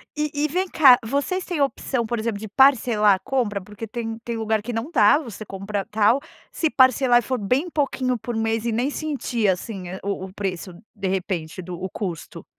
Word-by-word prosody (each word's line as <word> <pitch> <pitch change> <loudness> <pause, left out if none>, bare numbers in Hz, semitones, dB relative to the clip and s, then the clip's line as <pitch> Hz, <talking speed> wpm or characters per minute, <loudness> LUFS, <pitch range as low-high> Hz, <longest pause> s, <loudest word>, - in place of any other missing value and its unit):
E 300 0 -1 0.2
e - - +2
vem 365 +5 -1
cá, 270 -8 +7
vocês 285 - -1
têm 350 -4 -4
opção, 265 -3 -1
por 235 +1 -2
exemplo, 220 -2 -2
de 220 - -6
parcelar 225 -4 +4
a - - -8
compra? 225 -4 -1
Porque 210 +3 -9
tem 225 0 -5
tem 235 - -4
lugar 220 -1 0
que 245 - -5
não 230 +7 -4
dá. 215 -1 +5
Você 230 - -8
compra 195 0 -4
tal 220 +4 +3 0.3
se 320 - 0
parcelar 260 -2 +4
e - - -2
for 255 -1 -2
bem 255 - 0
pouquinho 260 -5 0
por 240 +2 -5
mês 225 0 -1
e 235 - 0
nem 240 +5 0
sentir 275 -8 -2
assim 190 0 -2
a 190 +1 -6
o 200 -1 -3
o 190 - -12
preço, 185 -2 -4 0.2
de 200 -2 -3
repente, 185 -3 -3
do 180 0 -8
o 190 - -3
custo? 175 -5 -6
225 Hz, 210 wpm, -23 LUFS, 200-260 Hz, 0.3 s, cá